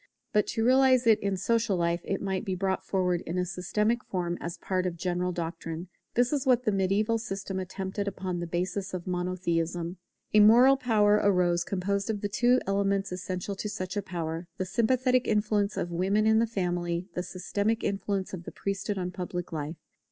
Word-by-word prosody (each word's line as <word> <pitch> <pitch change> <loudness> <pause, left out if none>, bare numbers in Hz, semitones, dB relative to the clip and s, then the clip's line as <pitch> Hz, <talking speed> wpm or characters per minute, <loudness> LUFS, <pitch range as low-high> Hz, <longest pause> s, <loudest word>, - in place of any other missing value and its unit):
But 210 - +3
to 225 - -1
realize 260 0 +5
it 225 -2 +5
in 195 -1 -1
social 225 0 +1
life 170 0 0
it 195 - -3
must 190 0 -1
be 190 -4 -2
brought 190 0 -1
forward 180 -2 0
in 170 - -2
a 180 - +1
systematic 210 +6 0
form 175 -2 -2
as 170 0 -5
part 185 -1 -1
of 175 - -3
a - - -16
general 180 +1 -1
doctrine. 165 0 -5 0.3
This 245 +3 +3
is 280 -3 +1
what 250 -2 +3
the 215 - +2
mediaeval 200 +4 +1
system 195 -4 -4
attempted 190 +2 -4
upon 185 -2 -3
the 175 - -4
basis 185 +3 -2
of 175 - -5
Monotheism. 175 -1 -2 0.4
A 210 - +7
moral 240 +6 +7
power 210 -5 +3
arose 180 -3 +3
composed 200 +3 -1
of 210 -2 -2
the 205 - -2
two 245 +4 +3
elements 195 0 0
essential 185 +1 -4
to 210 - -3
such 185 -2 -4
a 205 - 0
power, 165 -2 -4
the 185 - -1
sympathetic 250 +5 +2
influence 210 -1 +1
of 175 - -2
women 195 +5 +1
in 220 0 +5
the 230 - +2
family, 175 -4 -2
the 180 - -2
systematic 205 +5 -2
influence 195 -1 -2
of 175 -2 -6
the - - -6
priesthood 200 +1 -3
on 180 -1 -2
public 180 -1 -5
life. 155 0 -4
195 Hz, 195 wpm, -28 LUFS, 180-210 Hz, 0.4 s, A